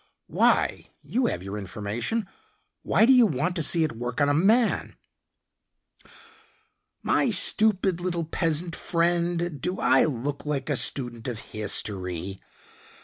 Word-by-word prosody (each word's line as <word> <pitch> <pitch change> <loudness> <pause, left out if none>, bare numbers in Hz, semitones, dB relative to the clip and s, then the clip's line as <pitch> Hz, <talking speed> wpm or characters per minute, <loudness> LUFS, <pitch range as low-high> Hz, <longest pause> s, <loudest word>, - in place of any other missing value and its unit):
"Why? - - +1
You 245 0 0
have - - -3
your 100 +2 -5
information. 105 - -3 0.5
Why - - +3
do 265 - +6
you 245 -3 +6
want 175 +3 -2
to - - 0
see 165 +2 +3
it 155 - -1
work 120 +2 -5
on 145 0 +3
a - - +2
man?" 215 +10 +2 2.1
"My - - +2
stupid, 195 -5 +3
little 175 -2 -2
peasant 165 +1 -1
friend, 170 -2 -1
do 180 +5 -2
I 130 - +4
look 140 0 -3
like 150 -1 -3
a - - +1
student 120 -4 -1
of 120 -3 -4
history?" 95 -4 -4
150 Hz, 135 wpm, -25 LUFS, 120-175 Hz, 2.1 s, do